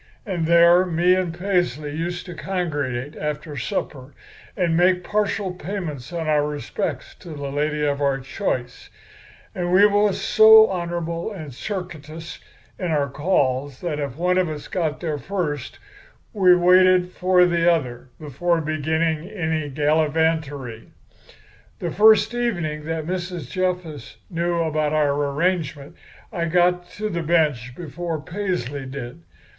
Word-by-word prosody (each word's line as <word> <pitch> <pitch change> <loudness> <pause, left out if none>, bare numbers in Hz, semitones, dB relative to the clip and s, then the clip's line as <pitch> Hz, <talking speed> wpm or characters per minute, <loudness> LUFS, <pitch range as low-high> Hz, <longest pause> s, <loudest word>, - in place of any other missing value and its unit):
And 175 -6 -2
there 170 +1 +6
me 175 0 +2
and 185 -2 0
Paisley 175 -6 -1
used 175 +2 -4
to 180 - -8
congregate 145 -8 -3
after 150 0 -4
supper 135 +1 -4 0.4
and 175 -4 +1
make 180 +1 +3
partial 205 -1 -1
payments 175 -7 -6
on 165 -2 -3
our 150 -1 +3
respects 145 -2 -4
to - - -12
the 140 -1 -5
lady 150 +1 -1
of 145 0 -1
our 140 -1 +1
choice. 125 -1 -4 0.6
And 175 -1 -2
we 195 +3 +6
was 205 -1 +2
so 220 +2 +7
honorable 170 +1 -3
and 155 -9 -8
circuitous 165 - -7 0.4
in 185 - -2
our 145 -3 +1
calls 140 -4 0
that 160 -4 -3
if 140 -4 -4
one 180 +2 +2
of 180 -3 +1
us 150 -2 -6
got 160 -5 -2
there 155 -4 -2
first 150 -4 -3 0.6
we 185 -4 +5
waited 180 0 +5
for 180 0 +3
the 170 -1 +3
other 130 -6 -2
before 165 +4 -1
beginning 160 +2 -1
any 160 -7 -2
gallivantery. 150 -4 0 0.9
"The 170 - -4
first 220 +4 +5
evening 175 -11 -2
that 160 -1 -3
Mrs. 175 -5 -4
Jessup 180 -5 -3
knew 170 0 0
about 155 -1 0
our 150 -2 +2
arrangement 145 0 -1 0.4
I 170 -3 -1
got 175 +1 +2
to 215 +1 -3
the 170 -3 -2
bench 150 -7 +1
before 165 +1 -5
Paisley 155 -6 -4
did. 125 -8 -7
165 Hz, 140 wpm, -22 LUFS, 145-180 Hz, 0.9 s, so